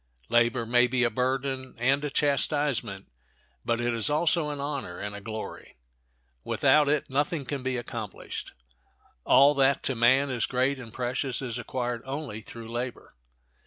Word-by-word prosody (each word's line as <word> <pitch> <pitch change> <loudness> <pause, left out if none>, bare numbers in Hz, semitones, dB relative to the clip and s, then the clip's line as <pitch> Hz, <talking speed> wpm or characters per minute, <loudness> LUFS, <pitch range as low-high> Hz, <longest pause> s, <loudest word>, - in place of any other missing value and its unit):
Labor 120 +1 +3
may 120 +2 +4
be 125 0 +1
a 120 - +2
burden 130 0 -2
and 135 +5 +2
a 150 - -1
chastisement, 140 -8 0 0.6
but 115 - 0
it 120 0 0
is 115 +2 0
also 155 +1 +2
an 145 -1 -4
honor 140 -10 -4
and 105 0 -5
a 100 - -8
glory. 110 +1 -7 0.7
Without 150 -1 +3
it 150 -1 +1
nothing 145 +2 -1
can 140 +1 -3
be 130 0 -1
accomplished. 115 -4 -6 0.7
All 140 +2 +6
that 135 0 +3
to 135 - 0
man 130 +4 +4
is 120 -3 0
great 130 +2 +1
and 115 -3 -9
precious 125 +1 -2
is 125 -3 -4
acquired 120 -1 -3
only 135 -5 -5
through 115 +1 -10
labor. 120 +1 -5
130 Hz, 160 wpm, -27 LUFS, 120-140 Hz, 0.7 s, All